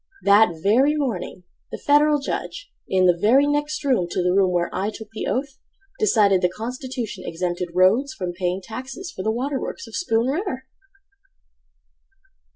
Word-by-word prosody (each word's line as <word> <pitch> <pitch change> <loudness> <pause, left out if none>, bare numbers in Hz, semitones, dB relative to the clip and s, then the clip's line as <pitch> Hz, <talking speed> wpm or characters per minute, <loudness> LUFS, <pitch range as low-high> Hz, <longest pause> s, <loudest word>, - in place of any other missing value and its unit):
That 200 -1 +5
very 260 +9 +4
morning 225 -10 -3 0.3
The - - -5
Federal 295 +1 +4
Judge, 390 - -5 0.2
in 185 -1 +2
the 180 -1 +5
very 235 +10 +4
next 295 +1 -1
room 250 -11 +1
To 180 - -1
the 180 0 +2
room 190 -1 +3
where 175 -1 0
I 200 +2 -1
took 220 0 -9
the 220 - -4
oath, 270 +1 -3 0.4
Decided 205 - +3
the 180 - +2
constitution 235 0 -6
Exempted 175 +1 -3
Rhodes 215 +10 +4
from 180 -3 -4
paying 180 +1 -2
taxes 260 - -7
For - - -7
the 220 - -1
water 265 +5 -1
works - - -6
of - - -10
Spoon 230 -10 +1
River! 270 -2 -2
225 Hz, 165 wpm, -22 LUFS, 185-280 Hz, 0.4 s, That